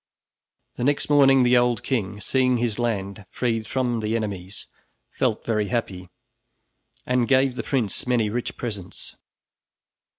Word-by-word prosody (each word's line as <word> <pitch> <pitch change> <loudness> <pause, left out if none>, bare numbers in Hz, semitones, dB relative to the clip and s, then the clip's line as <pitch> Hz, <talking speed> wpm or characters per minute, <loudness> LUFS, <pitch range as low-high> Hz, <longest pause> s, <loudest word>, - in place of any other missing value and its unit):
The - - -3
next 145 +2 0
morning, 135 -2 +6
the 125 0 +4
old 120 -1 +2
king, 105 -6 -2
seeing 130 +2 +1
his 120 -2 -1
land 105 -3 -2
freed 115 -3 -2
from 125 -2 -1
the 110 +1 -1
enemies, 100 -4 -4 0.4
felt - - -1
very 105 -3 0
happy, 95 -7 -3 1.0
and 125 -2 +1
gave 135 -1 +3
the 125 - -4
prince 125 -4 -2
many 120 -4 +2
rich 120 +3 -4
presents. 105 -7 -7
120 Hz, 135 wpm, -24 LUFS, 105-125 Hz, 1.0 s, morning